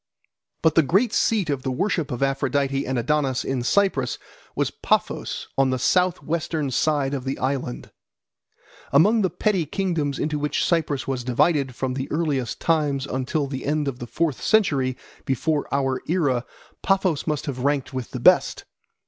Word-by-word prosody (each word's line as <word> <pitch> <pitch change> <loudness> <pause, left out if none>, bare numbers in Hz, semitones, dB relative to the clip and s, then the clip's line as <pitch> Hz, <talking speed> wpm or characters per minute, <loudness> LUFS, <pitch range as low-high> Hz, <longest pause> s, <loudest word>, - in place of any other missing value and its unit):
But 160 - +4
the 165 - +6
great 195 - +2
seat 210 -6 +2
of 140 -2 -2
the 130 - -3
worship 160 +3 -1
of 125 +2 -2
Aphrodite 135 0 0
and 130 0 -1
Adonis 135 +1 0
in 135 -2 -1
Cyprus 135 -3 +1 0.4
was - - 0
Paphos - - -1
on 135 -1 +4
the 130 - 0
south 180 +7 +2
western 155 -3 -2
side 140 +1 +1
of 135 -3 -3
the 135 +1 -3
island. 130 -2 -3 1.0
Among 210 +11 +5
the 190 - +2
petty 180 -1 0
kingdoms 160 -6 -1
into 150 -1 -1
which 150 0 0
Cyprus 155 -5 0
was 130 -2 -2
divided 130 +1 +1
from 130 0 -2
the 130 +1 -4
earliest 145 -6 -1
times 145 -5 +1
until 135 +3 -1
the 135 -1 -5
end 150 0 0
of 130 -2 -3
the 120 - -6
fourth 150 +3 -1
century 135 - +2 0.3
before 145 +3 -1
our 135 -2 0
era 145 -8 +1 0.3
Paphos 190 -6 +1
must 150 -3 -1
have 130 -3 -4
ranked 140 0 0
with 130 -3 -4
the - - -5
best. - - +4
140 Hz, 165 wpm, -23 LUFS, 130-160 Hz, 1.0 s, the